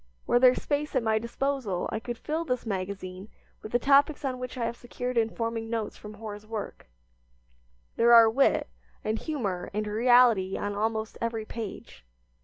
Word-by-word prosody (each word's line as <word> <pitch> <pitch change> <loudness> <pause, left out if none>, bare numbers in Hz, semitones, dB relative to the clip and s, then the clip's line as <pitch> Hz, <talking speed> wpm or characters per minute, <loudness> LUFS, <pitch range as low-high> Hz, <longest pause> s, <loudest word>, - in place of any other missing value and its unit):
Were 240 - +3
there 255 0 +6
space 295 0 -2
at 255 - +2
my 220 -1 +2
disposal 235 -4 -2
I 220 - -2
could 240 +1 -6
fill 315 +6 -2
this 250 -6 -2
magazine 190 -1 -5 0.3
with 215 - -8
the 240 - +4
topics 280 +3 +3
on 255 -2 -2
which 250 0 -6
I 235 - -1
have 235 0 -3
secured 245 +1 -5
informing 230 0 -1
notes 225 -2 -3
from 210 0 -10
Hoar's 210 -1 -8
work. 220 - -6 1.1
There 235 +1 +5
are 230 -1 +9
wit, 260 +5 +2 0.4
and 220 +1 -1
humor, 205 - -3
and 215 0 -1
reality 225 -3 +4
on 205 0 -3
almost 220 +1 -2
every 230 -1 -2
page. 215 - -8
230 Hz, 170 wpm, -28 LUFS, 215-250 Hz, 1.1 s, are